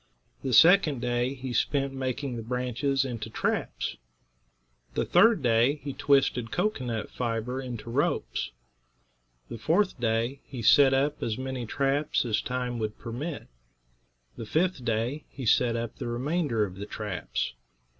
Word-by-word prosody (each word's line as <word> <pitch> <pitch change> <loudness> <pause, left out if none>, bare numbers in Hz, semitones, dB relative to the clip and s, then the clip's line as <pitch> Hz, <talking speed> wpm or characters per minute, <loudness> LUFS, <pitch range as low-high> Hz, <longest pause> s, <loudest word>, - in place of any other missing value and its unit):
The 130 - -2
second 160 - +6
day 120 +2 0
he 130 -1 -5
spent 135 +3 0
making 130 0 -3
the 115 - -4
branches 125 +3 -1
into 115 -4 -5
traps. - - -2 1.0
The - - +1
third 200 -2 +5
day 120 +4 +4
he 140 -1 -4
twisted 135 -4 +2
cocoanut 125 - -2
fiber 120 +2 -2
into 125 -3 -7
ropes. 140 +5 0 1.0
The 115 - -7
fourth 165 - +1
day 115 +3 0
he 125 -5 -6
set 135 +4 +6
up 145 +2 0
as 110 -2 -1
many 130 -2 -4
traps 140 +3 0
as 110 -2 +1
time 125 -1 -3
would 110 -1 -3
permit. 135 +7 -5 0.9
The 110 - -6
fifth 165 0 0
day 115 +6 -1
he 135 - -7
set 115 +1 +3
up 115 0 -3
the - - -4
remainder 125 -1 0
of 95 -2 -9
the 100 +1 -6
traps. 105 - -3
125 Hz, 145 wpm, -28 LUFS, 115-140 Hz, 1.0 s, second